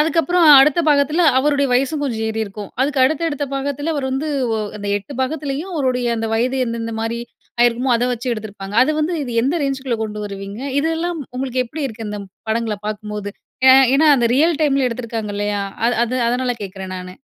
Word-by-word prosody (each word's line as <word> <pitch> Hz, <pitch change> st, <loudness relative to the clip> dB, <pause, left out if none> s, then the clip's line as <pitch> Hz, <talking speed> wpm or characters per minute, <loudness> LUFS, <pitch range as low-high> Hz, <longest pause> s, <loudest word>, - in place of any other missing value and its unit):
அதுக்கப்புறம் 330 Hz, +2 st, +3 dB
அடுத்த 300 Hz, +4 st, +4 dB
பாகத்துல, 300 Hz, +4 st, +3 dB
அவருடைய 280 Hz, +1 st, +2 dB
வயசும் 280 Hz, +4 st, 0 dB
கொஞ்சம் 225 Hz, -5 st, -2 dB
ஏறிருக்கும். 215 Hz, -2 st, -5 dB
அதுக்கு 275 Hz, 0 st, 0 dB
அடுத்தடுத்த 290 Hz, 0 st, 0 dB
பாகத்துல, 285 Hz, +3 st, -2 dB
அவரு 280 Hz, -3 st, -2 dB
வந்து 275 Hz, +4 st, -2 dB, 0.3 s
ஒ -, -, -2 dB, 0.2 s
அந்த 205 Hz, -, -6 dB
8 265 Hz, +7 st, -11 dB
பாகத்துலயும் 300 Hz, +5 st, -3 dB
அவருடைய 255 Hz, -4 st, 0 dB
அந்த 225 Hz, 0 st, -2 dB
வயது 255 Hz, +4 st, 0 dB
எந்தெந்த 230 Hz, -1 st, -4 dB
மாரி, 230 Hz, +1 st, -2 dB, 0.4 s
ஆயிருக்குமோ 240 Hz, +2 st, +3 dB
அத 240 Hz, -, 0 dB
வச்சு 245 Hz, +2 st, -4 dB
எடுத்திருப்பாங்க. 205 Hz, -2 st, -7 dB
அது 270 Hz, -, +2 dB
வந்து, 320 Hz, +3 st, 0 dB
இது 245 Hz, -, -5 dB
எந்த 275 Hz, +5 st, +1 dB
ரேஞ்சுக்குள்ள 265 Hz, -4 st, -2 dB
கொண்டு 210 Hz, -1 st, -6 dB
வருவீங்க? 200 Hz, +2 st, -7 dB, 0.2 s
இதெல்லாம் 325 Hz, +2 st, -1 dB, 0.2 s
உங்களுக்கு 255 Hz, -1 st, -1 dB
எப்படி 305 Hz, +6 st, -6 dB
இருக்கு, 225 Hz, -2 st, -7 dB
இந்தப் 205 Hz, -1 st, -6 dB, 0.2 s
படங்கள 225 Hz, -1 st, -1 dB
பாக்கும்போது? 210 Hz, -1 st, -5 dB, 0.4 s
ஏ -, -, +10 dB, 0.3 s
ஏன்னா, 315 Hz, -, +4 dB
அந்த 235 Hz, -1 st, +2 dB
ரியல் 320 Hz, +1 st, +3 dB
டைம்ல 275 Hz, -3 st, +2 dB
எடுத்துருக்காங்க, 230 Hz, -3 st, -4 dB
இல்லையா? 205 Hz, -1 st, -1 dB, 0.2 s
அ -, -, +4 dB, 0.2 s
அது 245 Hz, +2 st, -3 dB
அதனால 250 Hz, +1 st, 0 dB
கேக்குறேன், 190 Hz, -1 st, -7 dB
நானு. 185 Hz, 0 st, -8 dB
255 Hz, 175 wpm, -19 LUFS, 220-285 Hz, 0.4 s, ஏ